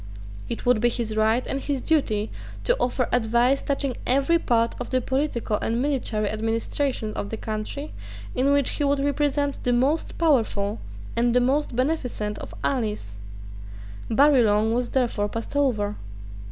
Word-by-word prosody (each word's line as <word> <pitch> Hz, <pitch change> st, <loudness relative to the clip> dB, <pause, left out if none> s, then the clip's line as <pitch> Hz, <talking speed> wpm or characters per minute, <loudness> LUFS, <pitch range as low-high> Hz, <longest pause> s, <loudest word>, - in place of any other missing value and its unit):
It 235 Hz, -, -4 dB
would 245 Hz, -3 st, +3 dB
be 240 Hz, -, +4 dB
his 230 Hz, -2 st, -2 dB
right 220 Hz, +3 st, +2 dB
and 275 Hz, -, -3 dB
his 280 Hz, -1 st, -1 dB
duty 235 Hz, -8 st, 0 dB, 0.3 s
to -, -, +3 dB
offer 250 Hz, 0 st, 0 dB
advice 245 Hz, +3 st, +3 dB
touching 275 Hz, -2 st, -1 dB
every 275 Hz, +6 st, +3 dB
part 230 Hz, -5 st, +1 dB
of 245 Hz, -, -5 dB
the 255 Hz, -, +2 dB
political 260 Hz, -5 st, -1 dB
and 230 Hz, +3 st, -1 dB
military 250 Hz, -6 st, 0 dB
administration 225 Hz, +2 st, -1 dB
of 200 Hz, -, -4 dB
the 225 Hz, -, -4 dB
country 220 Hz, +8 st, -5 dB, 0.4 s
in 265 Hz, +3 st, +2 dB
which 285 Hz, -2 st, +2 dB
he 295 Hz, -, -1 dB
would 280 Hz, 0 st, +2 dB
represent 285 Hz, 0 st, 0 dB
the 245 Hz, -, +2 dB
most 275 Hz, +7 st, +1 dB
powerful 225 Hz, -9 st, +1 dB, 0.4 s
and 240 Hz, 0 st, +2 dB
the -, -, +6 dB
most 265 Hz, +1 st, +1 dB
beneficent 250 Hz, -6 st, -1 dB
of -, -, -8 dB
allies. 210 Hz, -, -2 dB, 0.9 s
Barillon 225 Hz, -5 st, +4 dB
was 245 Hz, 0 st, 0 dB
therefore 230 Hz, -5 st, 0 dB
passed 230 Hz, +6 st, -6 dB
over. 220 Hz, -8 st, +1 dB
245 Hz, 155 wpm, -24 LUFS, 220-280 Hz, 0.9 s, the